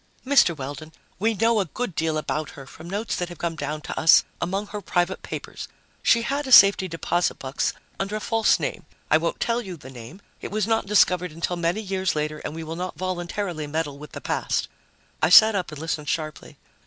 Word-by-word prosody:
"Mr. 250 - +4
Weldon, 145 +3 -7 0.3
we 220 +3 +1
know 225 +1 +3
a 195 - +1
good 210 +4 -4
deal 160 0 -1
about 155 0 -3
her 135 - -9
from 160 +5 -12
notes 205 +4 -2
that 175 0 -3
have 175 - -10
come 170 0 -3
down 150 0 -4
to - - -5
us 160 - +7 0.2
among 195 +4 -1
her 205 0 -7
private 180 0 -1
papers. - - -7 0.3
She 230 -1 +4
had 280 +3 -2
a - - -5
safety 195 -4 +8
deposit 175 +1 -1
box 135 +1 -2 0.3
under 195 +2 -2
a - - -2
false 225 0 +2
name. - - -4 0.2
I - - +6
won't - - -2
tell 235 +1 0
you 185 -6 -8
the 135 -2 -12
name; 125 - -11 0.2
it - - -5
was 215 -1 -1
not 225 -2 0
discovered 180 -4 +3
until 170 +3 -3
many 175 +4 -1
years 190 -3 -1
later, 150 0 -2
and 150 - -6
we 165 - -5
will 160 +1 -6
not 180 +2 -5
voluntarily 175 -2 -3
meddle 145 -2 -3
with 150 0 -11
the - - -7
past." - - -1 0.5
I 160 - +3
sat 220 +5 +9
up 185 -6 -2
and 155 - -8
listened 155 -2 -3
sharply. 155 -2 -4
175 Hz, 215 wpm, -24 LUFS, 155-205 Hz, 0.5 s, sat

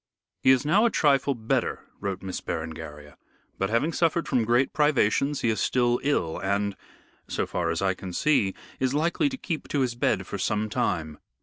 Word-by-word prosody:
"He - - +3
is 130 +1 +5
now 195 +9 +4
a 235 - +5
trifle 140 - +2
better," 110 -1 -1 0.2
wrote 95 -1 -4
Miss 95 -1 -4
Berengaria, 80 -2 -6 0.4
"but 95 - 0
having 120 +9 +1
suffered 165 0 +1
from 125 -5 +1
great 120 +4 +2
privations 145 -1 +2
he 115 - +2
is 110 - 0
still 120 -1 +2
ill, 135 - 0
and, 100 +1 -1 0.5
so - - -1
far 85 -2 -2
as 85 +3 -1
I 95 -1 +2
can 90 0 -8
see, 105 - +2 0.2
is 130 +1 0
likely 170 - +1
to 265 - -6
keep 165 -10 -4
to 145 - 0
his 125 -2 0
bed 120 - 0
for - - -5
some 105 0 0
time. 80 -6 -1
120 Hz, 190 wpm, -26 LUFS, 95-145 Hz, 0.5 s, is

